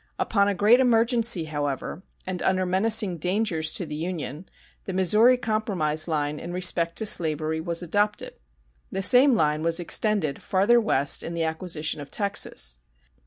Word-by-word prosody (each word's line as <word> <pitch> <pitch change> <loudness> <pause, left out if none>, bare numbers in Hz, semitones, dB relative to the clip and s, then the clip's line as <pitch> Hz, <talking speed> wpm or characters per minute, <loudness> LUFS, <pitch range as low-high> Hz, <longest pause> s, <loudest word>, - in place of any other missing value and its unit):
Upon 200 -2 +1
a 205 - -1
great 215 +7 +4
emergency, 230 -5 +2
however, 145 +1 -5 0.2
and 185 -1 -5
under 185 0 0
menacing 190 0 +1
dangers 180 -3 -1
to 180 - -1
the 150 - -8
Union, 160 0 -6 0.4
the 190 - -5
Missouri 210 +7 +3
compromise 190 -10 -1
line 150 -2 -2
in 175 - -8
respect 175 -2 +1
to 220 - +2
slavery 160 -4 +1
was 170 +1 -2
adopted. 205 +4 -1 0.6
The 195 - -3
same 255 +4 +5
line 150 -4 0
was 165 +1 +1
extended 175 -4 -1
farther 205 +5 +2
west 140 -10 +1
in 170 - -6
the 165 - -1
acquisition 160 -2 -3
of 145 - -10
Texas. 65 - -1
180 Hz, 155 wpm, -24 LUFS, 155-210 Hz, 0.6 s, same